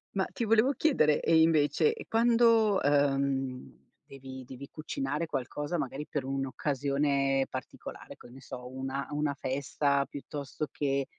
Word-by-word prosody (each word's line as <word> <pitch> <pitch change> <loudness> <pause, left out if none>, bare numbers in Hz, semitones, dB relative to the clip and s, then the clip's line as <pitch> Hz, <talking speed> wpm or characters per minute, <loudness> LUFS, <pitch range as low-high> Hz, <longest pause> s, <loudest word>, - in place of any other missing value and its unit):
Ma 190 -1 +1
ti - - -5
volevo 225 +4 +4
chiedere: 235 - +3
e 160 - +4
invece, 160 - +3
e 450 - -9
quando, 230 -3 +4
uhm, 135 - 0 0.3
devi 130 -1 -10
devi 130 +2 -10
cucinare 150 +1 -3
qualcosa, 145 +4 -3
magari 150 0 -4
per 145 - -2
un'occasione 135 0 0
particolare, 130 -1 -8
che - - -15
ne 135 +2 -13
so, 125 -1 -8
una 130 +1 -4
una 145 -1 -1
festa, 140 +1 0
piuttosto 145 +1 -6
che, 140 -1 0
140 Hz, 135 wpm, -30 LUFS, 135-155 Hz, 0.3 s, volevo